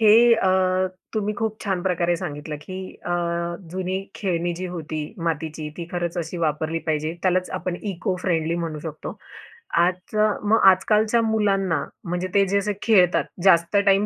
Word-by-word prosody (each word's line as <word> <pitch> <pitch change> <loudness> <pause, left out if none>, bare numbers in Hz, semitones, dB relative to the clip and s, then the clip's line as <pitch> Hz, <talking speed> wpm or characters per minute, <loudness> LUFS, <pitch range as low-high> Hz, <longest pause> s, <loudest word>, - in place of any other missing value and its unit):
हे 215 -2 +6 0.2
अ, 190 - +1 0.7
तुम्ही 210 -1 0
खूप 220 0 -2
छान 190 -3 -1
प्रकारे 175 -2 +1
सांगितलं 150 -3 -5
की 185 +4 -7 0.3
अ, - - -2 0.6
जुनी 185 +1 -2 0.2
खेळणी 175 -3 -1
जी 185 +2 -4
होती 155 -2 -4 0.3
मातीची, 155 -1 -2
ती 170 - -5
खरंच 175 0 -2
अशी 165 +1 -4
वापरली 160 0 0
पाहिजे. 155 0 0
त्यालाच 185 0 +1
आपण 180 -1 -3
इको 190 -1 -2
फ्रेंडली 165 -2 +1
म्हणू 155 -2 -4
शकतो. 155 -1 -7 0.6
आजच्या, 185 +5 +2 0.2
मग 225 +1 +5
आजकालच्या 215 +4 +2
मुलांना 195 -8 +1 0.2
म्हणजे 180 +1 -2
ते 200 0 +5
जे 200 +2 +2
असे 205 +1 0
खेळतात 185 -6 +4 0.2
जास्त 170 0 +5
टाईम 195 +1 +4
180 Hz, 155 wpm, -23 LUFS, 165-200 Hz, 0.7 s, हे